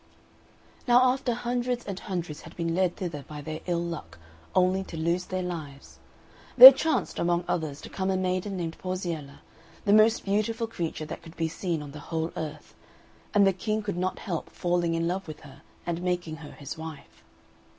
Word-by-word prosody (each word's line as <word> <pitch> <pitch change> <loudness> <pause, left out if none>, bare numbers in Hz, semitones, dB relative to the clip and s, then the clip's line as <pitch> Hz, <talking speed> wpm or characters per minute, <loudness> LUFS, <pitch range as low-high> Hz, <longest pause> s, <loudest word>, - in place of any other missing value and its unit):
Now 245 +1 +6
after 260 -3 -2
hundreds 245 0 -2
and 195 -2 -5
hundreds 175 -6 -5
had 165 - -13
been 165 -1 -1
led 180 0 +1
thither 170 -6 -5
by 150 -1 -7
their 155 +1 -5
ill 170 -1 0
luck, 165 - -6 0.4
only 185 +1 +3
to 165 - -8
lose 170 +3 0
their 185 0 -3
lives, 155 -6 -7 0.6
there - - +15
chanced, 315 -6 -1
among 175 0 +1
others, 155 -4 -2
to - - -9
come 190 0 -2
a 190 - +1
maiden 185 +1 -1
named 165 -2 -4
Porziella, 170 -6 -4 0.4
the 200 - +4
most 215 +2 +5
beautiful 215 +3 0
creature 170 -8 -4
that 155 - -7
could 165 -1 -14
be 165 - 0
seen 165 -1 -3
on 145 - -9
the 150 - -9
whole 160 +2 -3
earth, 155 -2 -6 0.6
and 200 -1 +6
the 195 - +4
King 215 +3 -2
could 205 -2 -3
not 185 +1 -1
help 175 -6 -4
falling 175 -1 0
in 165 0 0
love 185 +2 -2
with 155 -1 -8
her 140 -1 -14 0.2
and 170 0 -2
making 175 -3 -2
her 155 -2 -10
his 150 +3 -8
wife. 160 -2 -10
175 Hz, 190 wpm, -27 LUFS, 160-195 Hz, 0.6 s, there